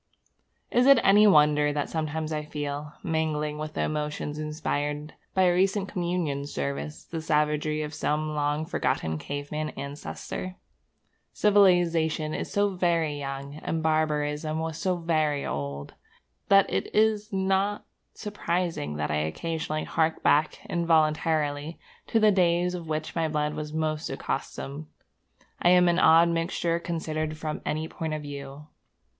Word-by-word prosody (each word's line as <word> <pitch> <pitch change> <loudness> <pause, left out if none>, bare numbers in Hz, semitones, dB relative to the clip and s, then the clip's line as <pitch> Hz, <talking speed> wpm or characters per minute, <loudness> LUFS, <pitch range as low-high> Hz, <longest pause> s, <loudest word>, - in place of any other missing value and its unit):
Is 245 +2 +4
it 275 -1 +9
any 205 +2 +7
wonder 150 -4 +5
that 145 -1 -1
sometimes 160 0 -3
I 150 0 -2
feel, 150 0 -5
mingling 150 -2 -1
with 155 0 -5
the - - 0
emotions 150 0 -3
inspired 150 -1 -3 0.2
by 190 - +4
a 180 -1 +4
recent 195 +2 +1
communion 170 -6 -2
service, 70 - -4
the 165 -1 -5
savagery 150 0 +1
of 150 0 -6
some 155 +1 -1
long 150 +1 0
forgotten 80 - -1
caveman 145 - -4
ancestor? 145 +6 -6 0.8
Civilization 175 -6 +3
is - - -4
so 205 0 +2
very 170 -5 0
young, 140 +1 -5
and 160 +1 -3
barbarism 155 -1 0
was 160 0 -3
so 185 -1 +1
very 155 -4 0
old, 70 0 -4 0.5
that 195 -1 +6
it - - -2
is 215 0 +2
not 195 +1 0 0.3
surprising 175 - -2
that 75 0 -2
I 75 - +1
occasionally 155 - -2
hark 160 -1 0
back 150 +2 +3
involuntarily 155 -2 +1 0.3
to 225 - +2
the 215 -1 +5
days 175 -2 +2
to 180 -1 -4
which 155 -1 -4
my 165 -1 +1
blood 150 -1 -1
was 150 0 -5
most 155 0 -2
accustomed. 145 +3 -4 0.7
I 175 - +5
am 180 0 +6
an 175 +1 +3
odd 165 0 +6
mixture 170 0 0
considered 155 -2 -3
from 155 -1 -4
any 155 +1 -1
point 160 -1 -4
of 150 - -5
view. 140 0 -8
155 Hz, 140 wpm, -27 LUFS, 150-170 Hz, 0.8 s, it